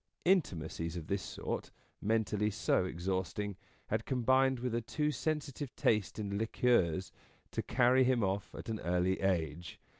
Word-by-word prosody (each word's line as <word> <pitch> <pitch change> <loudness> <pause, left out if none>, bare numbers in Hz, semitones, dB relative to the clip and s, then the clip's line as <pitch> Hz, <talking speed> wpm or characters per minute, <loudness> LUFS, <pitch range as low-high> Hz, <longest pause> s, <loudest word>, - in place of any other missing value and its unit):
Intimacies 85 - +1
of 80 - -5
this 95 +3 -1
sort, - - -4 0.3
mentally 105 -1 +1
so 105 - +1
exhausting, 95 +3 -2 0.3
had - - 0
combined 130 +1 +3
with 125 0 -2
a 120 - +1
too 150 +6 -1
sensitive 145 -3 -3
taste 105 -4 +1
in 100 -2 -2
liqueurs 100 -6 +2 0.4
to - - -1
carry 130 +1 +4
him 125 -3 +3
off 95 +1 -2
at - - -8
an 110 -2 -2
early 90 +2 +1
age. 85 -3 -1
105 Hz, 145 wpm, -33 LUFS, 95-125 Hz, 0.4 s, carry